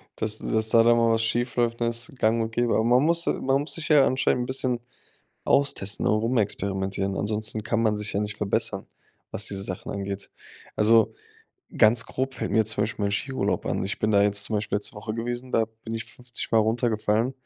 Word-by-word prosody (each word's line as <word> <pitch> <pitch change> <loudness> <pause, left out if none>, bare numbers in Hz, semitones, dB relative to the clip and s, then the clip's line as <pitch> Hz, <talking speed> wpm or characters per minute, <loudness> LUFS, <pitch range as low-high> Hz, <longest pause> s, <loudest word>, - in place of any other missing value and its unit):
dass 110 0 -2
dass 110 0 0
da 115 0 +5
dann 120 0 +5
mal 115 -1 +3
was 115 - +1
schiefläuft, 120 0 0
ne, 120 - +1
ist 120 +7 -1
gang 115 +1 +2
und 110 0 -3
gäbe. 120 0 0
Aber 110 - +2
man 125 +4 +4
muss 170 +2 +2
man 135 +1 +1
muss 145 -1 -4
sich 165 -1 -5
ja 145 -3 +6
anscheinend 130 -1 +1
'n - - -4
bisschen 130 -2 0 0.6
austesten, 120 -8 +1
auch 110 +1 +2
rumexperimentieren, 100 -4 -1
ansonsten 105 +1 -1
kann 115 -1 0
man 105 -2 +1
sich 105 -1 -3
ja 100 - 0
nicht 105 -1 -4
verbessern, 105 -2 -1 0.5
was 105 - -2
diese 95 -1 -2
Sachen 95 -2 -3
angeht. 100 0 -5 0.5
Also, 110 +1 +4 0.6
ganz 115 +2 +5
grob 130 +1 -3
fällt - - -4
mir 110 -1 +2
zum 110 - 0
Beispiel 105 -1 -2
mein 100 - 0
Skiurlaub 130 +5 -1
an. - - -2
Ich 100 - -3
bin 110 - 0
da 100 -1 +4
jetzt 100 0 +1
zum 110 - -3
Beispiel 105 0 -1
letzte 105 - -2
Woche 110 +1 -5
gewesen, 120 +2 -4
da 115 - +2 0.2
bin 115 0 -6
ich 115 - -4
50 125 -1 -6
Mal 115 - +5
runtergefallen, 110 +1 +1
115 Hz, 210 wpm, -25 LUFS, 105-120 Hz, 0.6 s, ja